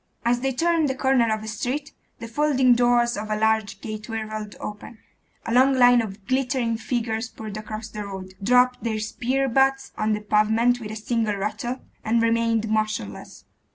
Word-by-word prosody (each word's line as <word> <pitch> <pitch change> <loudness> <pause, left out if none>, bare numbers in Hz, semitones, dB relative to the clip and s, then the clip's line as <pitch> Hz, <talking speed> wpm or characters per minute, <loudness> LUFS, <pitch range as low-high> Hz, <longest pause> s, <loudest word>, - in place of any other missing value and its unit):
As 240 +1 +2
they 270 +2 0
turned 330 +2 +1
the 265 - -1
corner 260 -4 +2
of 215 0 -2
a - - -7
street, 260 +7 -3 0.2
the 230 - -7
folding 265 0 +3
doors 240 0 +3
of 215 +1 -5
a 215 - 0
large 220 -2 0
gateway 215 +1 -5
rolled 215 -1 -6
open; 210 +2 -8 0.5
a 230 - -2
long 260 +2 +5
line 245 -1 +6
of 200 -2 -7
glittering 255 -2 0
figures 225 0 -2
poured 215 -3 -8
across 215 +1 -6
the 210 -1 -6
road, 190 -1 -8
dropped 250 +4 +3
their 225 -2 -1
spear 255 +5 -1
butts 270 +2 +2
on 215 0 +1
the 210 - -2
pavement 220 +4 +2
with 215 -3 -7
a 215 - -6
single 220 -1 -1
rattle, 240 +5 -3 0.2
and 230 +1 +2
remained 230 -1 +1
motionless. 215 - -3
230 Hz, 180 wpm, -24 LUFS, 215-250 Hz, 0.5 s, line